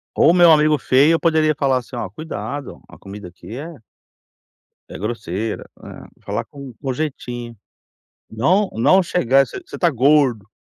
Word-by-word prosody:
Ou -, -, +5 dB
o -, -, +5 dB
meu 175 Hz, -2 st, +6 dB
amigo 155 Hz, -1 st, +4 dB
feio 140 Hz, +4 st, +3 dB
eu 165 Hz, -, +2 dB
poderia 155 Hz, -2 st, +2 dB
falar 135 Hz, -3 st, +1 dB
assim: 125 Hz, +1 st, -8 dB
"Olha, 115 Hz, -5 st, -4 dB
cuidado, 140 Hz, -, -7 dB
a -, -, -15 dB
comida 100 Hz, 0 st, -10 dB
aqui 105 Hz, +6 st, -11 dB
é" 160 Hz, +4 st, -8 dB, 1.1 s
"é -, -, -8 dB
grosseira.", 105 Hz, -1 st, -4 dB
é, -, -, -13 dB
falar -, -, -3 dB
com 140 Hz, -3 st, -11 dB
com 135 Hz, -2 st, -2 dB
jeitinho. 125 Hz, -5 st, -5 dB, 0.8 s
Não 180 Hz, -, +1 dB
não 185 Hz, -, +4 dB
chegar, 135 Hz, -5 st, +2 dB
você 385 Hz, -, -8 dB
você -, -, -9 dB
está 175 Hz, -, +2 dB
gordo. 130 Hz, -5 st, +2 dB
135 Hz, 165 wpm, -20 LUFS, 115-155 Hz, 1.1 s, meu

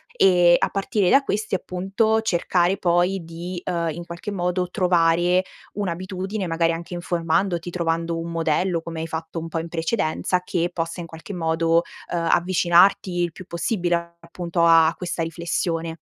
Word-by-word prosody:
e 175 Hz, -, +5 dB
a -, -, +1 dB
partire 195 Hz, -1 st, 0 dB
da 275 Hz, -, +5 dB
questi, 215 Hz, -5 st, -1 dB
appunto, 195 Hz, +5 st, 0 dB
cercare 180 Hz, -2 st, +1 dB
poi 175 Hz, +1 st, +1 dB
di, 170 Hz, +2 st, -6 dB
ehm, 170 Hz, -1 st, -1 dB
in 170 Hz, +2 st, -6 dB
qualche 170 Hz, +4 st, -7 dB
modo 180 Hz, -1 st, -1 dB
trovare 175 Hz, -1 st, +3 dB, 0.3 s
un'abitudine, 190 Hz, +1 st, -3 dB
magari 165 Hz, 0 st, +1 dB
anche 170 Hz, +2 st, -7 dB
informandoti, 175 Hz, 0 st, -1 dB
trovando 165 Hz, -1 st, -1 dB
un 165 Hz, 0 st, -5 dB
modello 165 Hz, +2 st, 0 dB
come 165 Hz, 0 st, -6 dB
hai 160 Hz, -, -3 dB
fatto 160 Hz, +1 st, -5 dB
un 165 Hz, -, -6 dB
po' 165 Hz, 0 st, -3 dB
in 165 Hz, +1 st, -6 dB
precedenza, 165 Hz, +1 st, -1 dB
che 175 Hz, -1 st, -1 dB
possa 165 Hz, 0 st, -4 dB
in 170 Hz, -, -7 dB
qualche 165 Hz, +5 st, -9 dB
modo, 165 Hz, -1 st, +1 dB, 0.3 s
ehm, 170 Hz, -1 st, -1 dB
avvicinarti 175 Hz, 0 st, +3 dB
il 170 Hz, -, -1 dB
più 185 Hz, -, -11 dB
possibile 170 Hz, -2 st, -1 dB
appunto 170 Hz, 0 st, -2 dB
a 165 Hz, -1 st, +6 dB
questa 175 Hz, -2 st, -3 dB
riflessione. 165 Hz, 0 st, -2 dB
175 Hz, 155 wpm, -23 LUFS, 165-185 Hz, 0.3 s, a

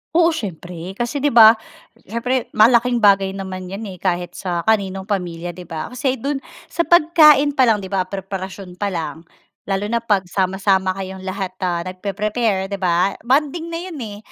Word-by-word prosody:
Oo, 335 Hz, 0 st, +5 dB
siyempre, 180 Hz, -, -6 dB
kasi 240 Hz, +6 st, -2 dB
’di 285 Hz, -, +1 dB
ba, 220 Hz, -2 st, +10 dB, 0.6 s
siyempre, 235 Hz, +4 st, -1 dB
malaking 235 Hz, +2 st, +4 dB
bagay 195 Hz, -1 st, +4 dB
naman 185 Hz, -1 st, -6 dB
’yan 195 Hz, +4 st, -6 dB
eh, 185 Hz, -, -11 dB
kahit 175 Hz, -2 st, -1 dB
sa 175 Hz, -3 st, -2 dB
kaninong 195 Hz, -3 st, 0 dB
pamilya, 175 Hz, -4 st, -3 dB
’di 180 Hz, +1 st, -11 dB
ba? 160 Hz, +4 st, -6 dB
Kasi 260 Hz, +1 st, -1 dB
do’n, 275 Hz, +3 st, -3 dB, 0.3 s
sa 340 Hz, -3 st, -1 dB
pagkain 305 Hz, -4 st, +6 dB
pa 260 Hz, -3 st, +3 dB
lang, 210 Hz, -3 st, +2 dB
’di 190 Hz, -, -8 dB
ba, 185 Hz, -2 st, 0 dB
preparasyon 190 Hz, -1 st, -7 dB
pa 205 Hz, -, 0 dB
lang, 165 Hz, -3 st, -5 dB, 0.4 s
lalo 195 Hz, 0 st, -1 dB
na 235 Hz, -, +2 dB
’pag 205 Hz, -4 st, +1 dB
sama-sama 190 Hz, 0 st, +1 dB
kayong 190 Hz, 0 st, -7 dB
lahat 190 Hz, -1 st, -3 dB
na 180 Hz, -1 st, -2 dB
nag-preprepare, 200 Hz, +1 st, -2 dB
’di 200 Hz, -, -3 dB
ba? 180 Hz, +1 st, +1 dB
Bonding 295 Hz, +7 st, 0 dB
na 335 Hz, 0 st, -4 dB
’yon 350 Hz, -6 st, -7 dB
eh, 210 Hz, -3 st, -6 dB
195 Hz, 175 wpm, -20 LUFS, 185-240 Hz, 0.6 s, ba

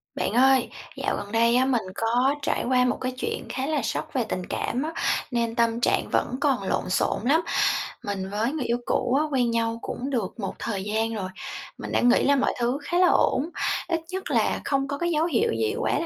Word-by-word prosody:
Bạn -, -, -1 dB
ơi, 260 Hz, 0 st, +4 dB, 0.3 s
dạo -, -, -1 dB
gần 205 Hz, -, -6 dB
đây 230 Hz, +1 st, +3 dB
á, 255 Hz, +1 st, +4 dB
mình 255 Hz, -4 st, +2 dB
có 245 Hz, +6 st, +2 dB
trải -, -, 0 dB
qua 250 Hz, 0 st, +3 dB
một 250 Hz, -, +1 dB
cái 255 Hz, -, -1 dB
chuyện -, -, -3 dB
khá 265 Hz, +1 st, -2 dB
là 300 Hz, -1 st, 0 dB
sốc 225 Hz, -, -3 dB
về 255 Hz, -, +1 dB
tình 180 Hz, -, -3 dB
cảm 255 Hz, +4 st, -2 dB
á, 320 Hz, +2 st, -4 dB, 0.4 s
nên 235 Hz, -1 st, 0 dB
tâm 230 Hz, 0 st, +1 dB
trạng -, -, +1 dB
vẫn -, -, +1 dB
còn 270 Hz, -8 st, +2 dB
lộn 190 Hz, -, -1 dB
xộn 185 Hz, -, +1 dB
lắm. 305 Hz, +6 st, +4 dB, 0.6 s
Mình 195 Hz, -3 st, -3 dB
với 215 Hz, +5 st, 0 dB
người 300 Hz, -5 st, -2 dB
yêu 235 Hz, -, +1 dB
cũ 245 Hz, -, 0 dB
á, -, -, +2 dB
quen 250 Hz, -4 st, +2 dB
nhau 230 Hz, 0 st, 0 dB
cũng 260 Hz, +3 st, -4 dB
được 235 Hz, -5 st, -2 dB
một 195 Hz, -, -3 dB
thời 200 Hz, -4 st, -3 dB
gian 220 Hz, +2 st, -1 dB
rồi, 195 Hz, -4 st, -3 dB, 0.5 s
mình -, -, -6 dB
đã -, -, +2 dB
nghĩ 245 Hz, 0 st, +4 dB
là 280 Hz, -, +4 dB
mọi 265 Hz, -, +1 dB
thứ 245 Hz, +3 st, +1 dB
khá 350 Hz, -, -1 dB
là 365 Hz, 0 st, +6 dB
ổn, 300 Hz, -2 st, +2 dB, 0.4 s
ít 335 Hz, -2 st, 0 dB
nhất 380 Hz, +1 st, -4 dB
là -, -, +1 dB
không 275 Hz, -1 st, 0 dB
có 280 Hz, 0 st, -3 dB
cái 345 Hz, +3 st, -1 dB
dấu 315 Hz, 0 st, +2 dB
hiệu 295 Hz, -9 st, +1 dB
gì 110 Hz, -1 st, 0 dB
quá -, -, 0 dB
là -, -, -2 dB
245 Hz, 230 wpm, -25 LUFS, 225-275 Hz, 0.6 s, là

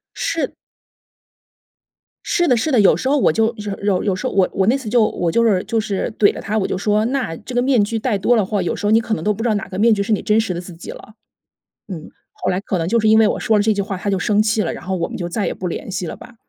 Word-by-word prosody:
是 330 Hz, -1 st, -2 dB, 1.7 s
是 350 Hz, -1 st, +1 dB
的， 250 Hz, -, +4 dB
是 260 Hz, +7 st, -1 dB
的， 245 Hz, -, +4 dB
有 200 Hz, -, +5 dB
时 260 Hz, -, -2 dB
候 290 Hz, -, +3 dB
我 270 Hz, -, +3 dB
就 225 Hz, +1 st, +1 dB
有 205 Hz, -1 st, -5 dB
有 195 Hz, -3 st, +1 dB
有 195 Hz, -3 st, 0 dB
时 185 Hz, -, -3 dB
候 -, -, -4 dB
我 190 Hz, -2 st, +3 dB
我 190 Hz, 0 st, +1 dB
那 250 Hz, +5 st, +4 dB
次 265 Hz, -5 st, -9 dB
就 235 Hz, +1 st, +3 dB
我 175 Hz, -5 st, -1 dB
就 230 Hz, -, +2 dB
是 200 Hz, -5 st, +2 dB
就 225 Hz, -, -1 dB
是 205 Hz, -3 st, -2 dB
怼 205 Hz, -, +5 dB
了 -, -, -6 dB
他， 215 Hz, +2 st, -2 dB
我 195 Hz, -, 0 dB
就 -, -, -2 dB
说： 210 Hz, +2 st, +1 dB
“那 250 Hz, -9 st, -2 dB
这 245 Hz, +4 st, -9 dB
个 245 Hz, -, +3 dB
面 250 Hz, -5 st, +3 dB
具 225 Hz, +2 st, -2 dB
戴 220 Hz, -2 st, 0 dB
多 240 Hz, +5 st, +2 dB
了 210 Hz, -4 st, +2 dB
话， 205 Hz, -1 st, -1 dB
有 175 Hz, -, -1 dB
时 -, -, -5 dB
候 210 Hz, -, +2 dB
你 225 Hz, +1 st, +5 dB
可 225 Hz, -1 st, -3 dB
能 -, -, -6 dB
都 210 Hz, 0 st, +2 dB
不 215 Hz, -, -7 dB
知 240 Hz, -, +1 dB
道 215 Hz, -, +2 dB
哪 200 Hz, -, -3 dB
个 185 Hz, -, -5 dB
面 230 Hz, +2 st, +5 dB
具 200 Hz, -1 st, 0 dB
是 215 Hz, -, 0 dB
你 210 Hz, -, 0 dB
真 215 Hz, +1 st, +2 dB
实 220 Hz, -4 st, -1 dB
的 175 Hz, -, -4 dB
自 180 Hz, -1 st, -11 dB
己 165 Hz, -, -9 dB
了。” 215 Hz, -, -13 dB, 0.8 s
嗯， 160 Hz, -3 st, -7 dB, 0.2 s
后 -, -, -3 dB
来 180 Hz, -, 0 dB
可 195 Hz, -2 st, -2 dB
能 165 Hz, 0 st, -2 dB
就 235 Hz, +4 st, +2 dB
是 220 Hz, -1 st, +2 dB
因 220 Hz, -, +6 dB
为 220 Hz, -1 st, +5 dB
我 -, -, -1 dB
说 220 Hz, -1 st, +2 dB
了 -, -, +3 dB
这 220 Hz, 0 st, +2 dB
句 200 Hz, -, -1 dB
话， 195 Hz, -1 st, -4 dB
他 200 Hz, -, -4 dB
就 195 Hz, -, +1 dB
生 210 Hz, +3 st, +2 dB
气 215 Hz, 0 st, +1 dB
了， 170 Hz, -, -2 dB
然 -, -, -8 dB
后 190 Hz, 0 st, -2 dB
我 170 Hz, -, -1 dB
们 -, -, -6 dB
就 175 Hz, -, -4 dB
再 200 Hz, +4 st, -2 dB
也 -, -, -1 dB
不 185 Hz, -, -6 dB
联 175 Hz, -, -5 dB
系 185 Hz, -1 st, -3 dB
了 -, -, -6 dB
吧。 245 Hz, -, -14 dB
210 Hz, 340 characters per minute, -19 LUFS, 190-225 Hz, 1.7 s, 因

